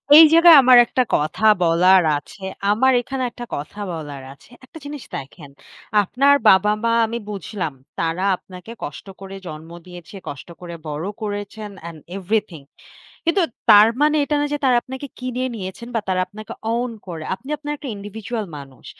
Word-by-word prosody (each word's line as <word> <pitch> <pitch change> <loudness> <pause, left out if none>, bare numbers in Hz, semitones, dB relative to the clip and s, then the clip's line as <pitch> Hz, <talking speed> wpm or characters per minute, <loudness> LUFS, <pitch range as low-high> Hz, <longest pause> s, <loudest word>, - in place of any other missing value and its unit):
এই 320 +1 +11
জায়গায় 335 -1 +9
আমার 255 0 +7
একটা 255 - 0
কথা 155 +8 -1 0.2
বলার 180 +2 +5
আছে। 190 +6 -12 0.3
আমার 260 +5 +3
এখানে 265 +1 -4
একটা 240 +1 -8
কথা 150 +8 -8
বলার 145 -4 -7
আছে। 140 - -22 0.2
একটা 315 - -14
জিনিস 290 -2 -7
দেখেন। 140 +2 -9 0.5
আপনার 275 +8 +3
বাবা-মা 210 +4 +4
আমি 230 +1 -4
বুঝলাম 195 -4 -4 0.3
তারা 165 +2 -1
আপনাকে 180 +4 -12
কষ্ট 145 - -7 0.2
করে 195 0 -8
জন্ম 155 0 -9 0.2
দিয়েছে, 180 +1 -12
কষ্ট 140 - -9
করে 170 -1 -7
বড় 150 +3 -4 0.2
করেছেন 205 0 -5
অ্যান্ড 165 -1 -9
অ্যান্ড 175 - -8
এভরিথিং। 195 -4 -2 0.6
কিন্তু 345 +3 +2 0.3
তার 210 +1 +8
মানে 300 +1 +4
এটা 295 +1 -1
নয় 290 0 -1
যে - - -5
তারা 250 -2 +4
আপনাকে 265 +2 -7
কিনে 255 0 -3
নিয়েছেন 195 +3 -7
বা 225 - +2
তারা 185 -1 +1
আপনাকে 215 +1 -10 0.2
অউন 240 +1 -1 0.2
করে। 165 -3 -6
আপনি 265 +8 -14
আপনার 295 0 -5
একটা 280 -2 -7
ইন্ডিভিজুয়াল 215 +2 -6
মানুষ। 135 -2 -13
205 Hz, 165 wpm, -21 LUFS, 170-255 Hz, 0.6 s, এই